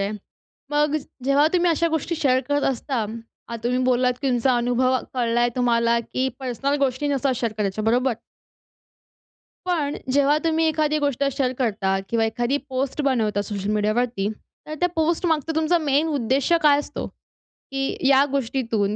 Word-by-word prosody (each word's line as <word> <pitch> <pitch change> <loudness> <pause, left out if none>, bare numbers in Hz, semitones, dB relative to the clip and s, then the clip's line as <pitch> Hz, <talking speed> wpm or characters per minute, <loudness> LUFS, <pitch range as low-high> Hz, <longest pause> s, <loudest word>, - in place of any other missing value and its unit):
आहे. 200 +2 -1 0.6
मग 295 +1 +2 0.3
जेव्हा 285 +2 +4
तुम्ही 355 -1 +3
अशा 335 +1 +1
गोष्टी 320 +2 -1
शेअर 260 -5 +2
करत 285 0 +1
असता, 265 +2 -4 0.5
आता 235 - -5
तुम्ही 250 +1 +1
बोललात, 250 0 +2
की 275 - 0
तुमचा 250 0 +2
अनुभव 245 +2 +2 0.2
कळलाय 240 -1 +1
तुम्हाला 235 -1 +2
की 255 +3 -2
पर्सनल 265 +2 -1
गोष्टी 260 +2 -1
नसतात 275 -2 +1
शेअर 230 -3 -1
करायच्या, 210 0 -2
बरोबर. 245 +3 +2 1.5
पण 305 -5 0 0.2
जेव्हा 285 +2 +4
तुम्ही 325 0 +2
एखादी 305 -1 +1
गोष्ट 285 -2 0
शेअर 255 -1 0
करता 200 -5 0
किंवा 230 -1 +1
एखादी 240 +4 0
पोस्ट 265 +2 -2
बनवता 220 -7 +1
सोशल 200 -1 -4
मीडियावरती 215 0 0 0.4
तर 305 - -5
त्या 355 - +3
पोस्ट 325 +2 +1
मागचा 320 -1 0
तुमचा 320 +2 +2
मेन 295 0 +1
उद्देश्य 280 +4 +1
काय 290 -1 +5
असतो? 290 - -5 0.5
की 270 0 -4
या 270 0 +6
गोष्टीतून 230 -6 -1
260 Hz, 155 wpm, -23 LUFS, 235-290 Hz, 1.5 s, या